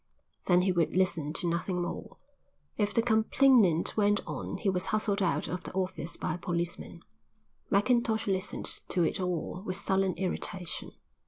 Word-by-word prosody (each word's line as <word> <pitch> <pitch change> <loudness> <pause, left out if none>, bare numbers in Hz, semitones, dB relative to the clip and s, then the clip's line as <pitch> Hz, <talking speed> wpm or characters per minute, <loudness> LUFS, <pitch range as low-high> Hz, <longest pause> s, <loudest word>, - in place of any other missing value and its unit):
Then 180 -1 +5
he 190 - +2
would 175 0 +1
listen 165 -5 +1
to 175 - 0
nothing 175 +2 -1
more; - - -6 0.6
if 210 -1 0
the 230 - +2
complainant 220 - +4
went 205 -1 +3
on - - -5
he 215 - -3
was 185 -2 +1
hustled 215 -1 0
out 185 - +1
of 180 - -4
the - - -8
office 185 -3 -3
by - - -2
a - - -4
policeman. 175 0 -3 0.7
Mackintosh 220 +1 +2
listened 195 0 -2
to 175 - +1
it 165 - 0
all 180 0 -2
with 185 -3 -1
sullen 190 -1 +1
irritation. 180 -1 -3
185 Hz, 160 wpm, -30 LUFS, 175-205 Hz, 0.7 s, Then